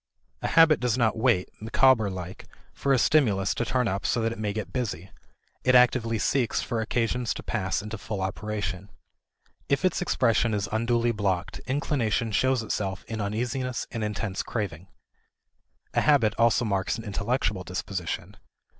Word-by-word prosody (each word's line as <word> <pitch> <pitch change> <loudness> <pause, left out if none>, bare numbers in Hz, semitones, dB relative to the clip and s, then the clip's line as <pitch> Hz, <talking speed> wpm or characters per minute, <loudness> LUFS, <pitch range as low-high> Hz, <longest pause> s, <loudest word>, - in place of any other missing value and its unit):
A - - -1
habit 165 -2 +5
does 125 -1 0
not 115 -3 +2
wait, 110 -5 +2
Micawber 115 -1 +4
like, 90 -1 -7 0.3
for 140 - -1
a 135 - +5
stimulus 110 -8 +3
to - - -1
turn 120 +2 0
up 100 -1 -2
so - - +1
that 115 - +1
it 115 - -7
may 105 -1 -1
get 105 0 -5
busy; 100 - -3 0.5
it 130 - +4
actively 125 -2 +4
seeks 120 +3 +1
for 115 -3 -2
occasions 115 +1 -1
to - - -7
pass 95 +1 -1
into 105 0 -6
full 100 +1 -5
operation. 100 -1 -4 0.8
If 140 +5 +2
its 180 -1 +1
expression 115 -8 +2
is 100 -1 -1
unduly 115 +2 +1
blocked, 100 -5 -2
inclination 125 -5 0
shows 130 +3 +2
itself 95 -3 -3
in 110 -1 -4
uneasiness 120 +4 -2
and 115 - -3
intense 105 -2 -2
craving. 95 -6 -4 1.1
A - - +2
habit 135 -8 +4
also 115 +1 +3
marks 100 0 0
an 115 - -7
intellectual 105 -1 -1
disposition. 90 -1 -4
110 Hz, 160 wpm, -26 LUFS, 100-125 Hz, 1.1 s, habit